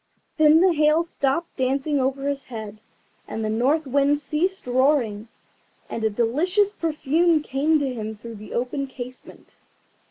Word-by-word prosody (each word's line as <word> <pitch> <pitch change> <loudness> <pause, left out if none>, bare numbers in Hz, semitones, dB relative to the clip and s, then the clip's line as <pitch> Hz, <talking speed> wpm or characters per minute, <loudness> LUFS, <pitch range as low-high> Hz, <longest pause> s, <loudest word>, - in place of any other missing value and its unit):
Then 310 +1 +6
the 370 -1 +4
Hail 305 +1 +3
stopped 330 0 -2
dancing 275 +2 0
over 270 +1 -1
his 280 -1 -3
head, 215 -3 -8 0.5
and 225 - -4
the 215 - -1
North 275 +8 +1
Wind 280 +2 +2
ceased 350 +6 -2
roaring, 250 -4 +1 0.6
and 225 - -4
a 220 - +3
delicious 335 - +1
perfume 320 -1 +1
came 300 +3 +1
to 275 -3 -2
him 220 -2 -5
through 225 +1 -10
the 215 - -9
open 255 +3 -2
casement. 255 -1 -11
275 Hz, 150 wpm, -23 LUFS, 240-310 Hz, 0.6 s, Then